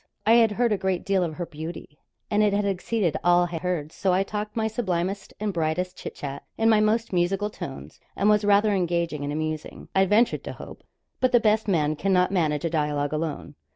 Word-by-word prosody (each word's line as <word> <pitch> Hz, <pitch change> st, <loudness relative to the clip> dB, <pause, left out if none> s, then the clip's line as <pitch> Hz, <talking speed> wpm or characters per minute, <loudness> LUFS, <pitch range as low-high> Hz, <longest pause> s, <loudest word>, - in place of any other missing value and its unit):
I 220 Hz, -, +4 dB
had 230 Hz, -2 st, +5 dB
heard 235 Hz, +2 st, +1 dB
a 205 Hz, -, +1 dB
great 190 Hz, -2 st, -1 dB
deal 195 Hz, -2 st, +2 dB
of 160 Hz, -3 st, -3 dB
her 175 Hz, -, -4 dB
beauty; 155 Hz, -1 st, -8 dB, 0.3 s
and 210 Hz, 0 st, +3 dB
it 210 Hz, -1 st, +3 dB
had 205 Hz, 0 st, +1 dB
exceeded 195 Hz, -2 st, 0 dB
all 175 Hz, 0 st, +5 dB
I 165 Hz, -, -3 dB
heard; 170 Hz, -4 st, -2 dB
so 190 Hz, +1 st, 0 dB
I 185 Hz, +2 st, +3 dB
talked 210 Hz, +1 st, -5 dB
my 220 Hz, -1 st, 0 dB
sublimest 195 Hz, -4 st, -2 dB
and 210 Hz, -1 st, -2 dB
brightest 170 Hz, +2 st, -1 dB
chit -, -, -8 dB
chat, 140 Hz, -1 st, -6 dB, 0.2 s
in 225 Hz, 0 st, +4 dB
my 215 Hz, -, +5 dB
most 215 Hz, +1 st, +1 dB
musical 195 Hz, +4 st, 0 dB
tones, 135 Hz, -9 st, -8 dB, 0.2 s
and 200 Hz, -, +1 dB
was 210 Hz, 0 st, +4 dB
rather 205 Hz, +1 st, +4 dB
engaging 170 Hz, -5 st, -1 dB
and 145 Hz, -, -3 dB
amusing, 155 Hz, 0 st, -4 dB
I 190 Hz, 0 st, +4 dB
ventured 220 Hz, +5 st, +2 dB
to -, -, -5 dB
hope. -, -, -11 dB, 0.4 s
But 255 Hz, -1 st, +1 dB
the 240 Hz, -, +7 dB
best 215 Hz, 0 st, +2 dB
man 155 Hz, -6 st, +1 dB
cannot 180 Hz, +2 st, +2 dB
manage 155 Hz, -5 st, 0 dB
a -, -, +1 dB
dialogue 150 Hz, -2 st, -1 dB
alone. 155 Hz, -2 st, -3 dB
185 Hz, 215 wpm, -25 LUFS, 160-210 Hz, 0.4 s, the